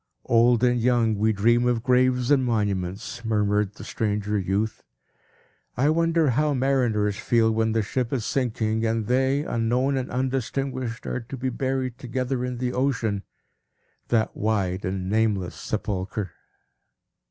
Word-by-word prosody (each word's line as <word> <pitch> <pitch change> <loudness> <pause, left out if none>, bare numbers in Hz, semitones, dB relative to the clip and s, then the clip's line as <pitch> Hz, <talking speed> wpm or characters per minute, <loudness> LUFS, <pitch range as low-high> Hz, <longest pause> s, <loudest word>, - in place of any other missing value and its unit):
"Old 120 +1 +4
and 125 -1 +3
young, 120 -2 +3
we 110 +1 +2
dream 120 +4 +3
of 120 -2 0
graves 125 0 +2
and 135 -2 +4
monuments," 105 -1 -2
murmured 105 -2 +1
the - - -10
stranger 105 -1 -2
youth. 100 +3 -1 1.0
"I 140 +5 +3
wonder 165 -2 +2
how 150 +3 +1
mariners 120 -6 +1
feel, 115 -2 +2
when 110 0 +1
the 110 -1 +1
ship 125 +3 -2
is 120 -5 -1
sinking, 110 -4 -1
and 115 -1 0
they, 130 +4 +2
unknown 125 +3 0
and 130 -1 -3
undistinguished, 130 -1 -2
are - - -2
to 120 +3 -8
be 130 +1 -1
buried 130 -1 -2
together 125 0 -2
in 125 -1 -3
the 125 0 -2
ocean, 120 -6 0 0.9
that 110 -2 +1
wide 100 -3 -1
and 95 0 -3
nameless 105 -3 +1
sepulchre?" 95 -1 -3
115 Hz, 140 wpm, -25 LUFS, 105-130 Hz, 1.0 s, Old